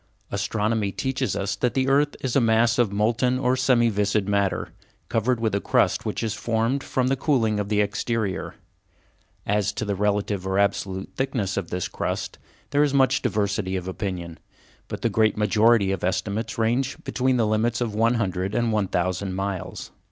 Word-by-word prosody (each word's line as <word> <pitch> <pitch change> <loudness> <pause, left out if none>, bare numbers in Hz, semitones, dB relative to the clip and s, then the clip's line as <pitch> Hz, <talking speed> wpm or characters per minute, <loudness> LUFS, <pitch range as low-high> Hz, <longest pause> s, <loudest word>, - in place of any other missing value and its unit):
Astronomy 105 -1 0
teaches 130 +3 -2
us 100 +1 -1
that 125 - 0
the 130 0 +1
earth 145 +2 +2
is 130 -2 -2
a 140 - +5
mass 115 +1 +3
of 115 -5 +3
molten 115 +5 +1
or 130 0 +1
semi 125 -2 +3
viscid 105 -1 0
matter, 100 -1 0 0.4
covered 115 +2 +1
with 110 -3 0
a 100 - 0
crust - - +1
which - - -2
has 110 -2 -1
formed 115 +5 -1
from 130 - 0
the 135 - +2
cooling 115 -7 +1
of 100 -1 -3
the 105 -1 +2
exterior. 105 -1 -2 0.9
As 105 0 +1
to 110 - -3
the 100 - -1
relative 100 -1 -1
or 95 0 0
absolute 100 -1 -1
thickness 120 -8 -1
of 95 -4 -3
this 90 0 -2
crust, - - -4 0.3
there 145 - +3
is 145 -2 +2
much 130 -1 +3
diversity 100 -2 -1
of 90 -1 -4
opinion, 90 -3 -5 0.5
but - - -6
the - - +4
great 110 -2 +2
majority 105 -1 +3
of 95 - -3
estimates 100 +4 -2
ranges 120 +4 +1
between 130 0 +1
the 115 - +2
limits 110 +2 +1
of 120 -4 -2
one 115 +3 +2
hundred 95 -3 -1
and 120 -1 +1
one 105 -3 +1
thousand 95 +2 -1
miles. 95 -1 -4
110 Hz, 180 wpm, -24 LUFS, 100-120 Hz, 0.9 s, a